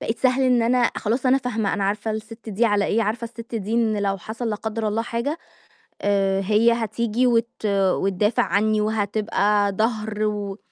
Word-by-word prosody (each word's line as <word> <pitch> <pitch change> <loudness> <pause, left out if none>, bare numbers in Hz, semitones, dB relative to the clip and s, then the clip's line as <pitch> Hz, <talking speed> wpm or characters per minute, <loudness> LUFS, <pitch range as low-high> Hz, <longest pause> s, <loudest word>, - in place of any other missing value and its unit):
بقيت 225 - -3
سهل 255 0 +2
إن 250 -2 +3
أنا 240 +1 +3
خلاص 235 +5 -1
أنا 260 +1 +4
فاهمة، 225 -5 -1
أنا 200 -1 -1
عارفة 205 +2 -1
السِت 220 +1 -7
دي 215 +3 0
على 205 -3 +2
إيه، 225 +3 +1
عارفة 225 +2 -2
السِت 230 0 -9
دي 215 -1 -3
إن 225 -2 +2
لو 195 -1 0
حصل 225 +5 -5
لا - - -1
قدّر 220 0 -3
الله 215 +2 -1
حاجة 240 +7 -3 0.6
آآ، 195 -1 +2
هي 215 +4 +3
هتيجي 230 +1 0
وت 230 -2 0
وتدافع 195 +1 +1
عنّي 215 +1 +1
وهتبقى 210 -1 +1
ضهر 215 0 -1
و 205 -1 -3
220 Hz, 180 wpm, -23 LUFS, 205-235 Hz, 0.6 s, أنا